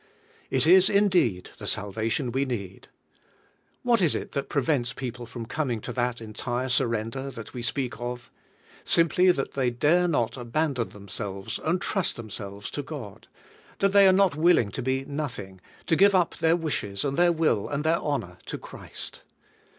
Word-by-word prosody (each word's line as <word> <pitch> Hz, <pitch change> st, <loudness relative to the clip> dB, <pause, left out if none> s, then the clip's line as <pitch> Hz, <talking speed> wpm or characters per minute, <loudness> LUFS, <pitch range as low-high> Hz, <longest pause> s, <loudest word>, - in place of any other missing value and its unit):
It 130 Hz, +1 st, +3 dB
is 185 Hz, +3 st, +7 dB
indeed 185 Hz, -, +2 dB
the -, -, -6 dB
salvation 110 Hz, +5 st, -1 dB
we 135 Hz, +3 st, +1 dB
need. 100 Hz, -8 st, -5 dB, 1.0 s
What 235 Hz, -4 st, +3 dB
is 170 Hz, -5 st, +3 dB
it -, -, -4 dB
that 140 Hz, -, -3 dB
prevents 135 Hz, -3 st, +1 dB
people 120 Hz, -2 st, -6 dB
from 115 Hz, 0 st, -7 dB
coming 125 Hz, -2 st, -2 dB
to 125 Hz, -, -5 dB
that 125 Hz, 0 st, -1 dB
entire 120 Hz, +3 st, -3 dB
surrender 125 Hz, +1 st, 0 dB
that 115 Hz, -4 st, -9 dB
we 125 Hz, -, -5 dB
speak 125 Hz, 0 st, -2 dB
of? 120 Hz, 0 st, -5 dB, 0.5 s
Simply 170 Hz, +2 st, +3 dB
that 135 Hz, -6 st, -2 dB
they 130 Hz, -3 st, +1 dB
dare 155 Hz, +9 st, +3 dB
not 135 Hz, -7 st, 0 dB
abandon 125 Hz, 0 st, -1 dB
themselves, 100 Hz, -1 st, -6 dB
and 175 Hz, +4 st, 0 dB
trust 195 Hz, -1 st, -1 dB
themselves, 100 Hz, -3 st, -7 dB
to 145 Hz, -, -3 dB
God; 130 Hz, -9 st, -8 dB, 0.5 s
that 195 Hz, 0 st, +2 dB
they 200 Hz, -1 st, +8 dB
are -, -, +7 dB
not 190 Hz, -2 st, +4 dB
willing 155 Hz, -9 st, +4 dB
to -, -, -4 dB
be 130 Hz, +1 st, -1 dB
nothing, 120 Hz, -11 st, -5 dB, 0.2 s
to 165 Hz, -, +3 dB
give 200 Hz, +3 st, +5 dB
up 180 Hz, -3 st, +2 dB
their 165 Hz, 0 st, +3 dB
wishes, 145 Hz, -, -2 dB
and 140 Hz, -1 st, -1 dB
their 175 Hz, +2 st, +4 dB
will, 155 Hz, -11 st, +1 dB
and 145 Hz, +1 st, -2 dB
their 160 Hz, +2 st, +2 dB
honor 90 Hz, -12 st, -3 dB
to -, -, -4 dB
Christ. -, -, -8 dB
130 Hz, 170 wpm, -26 LUFS, 115-160 Hz, 1.0 s, they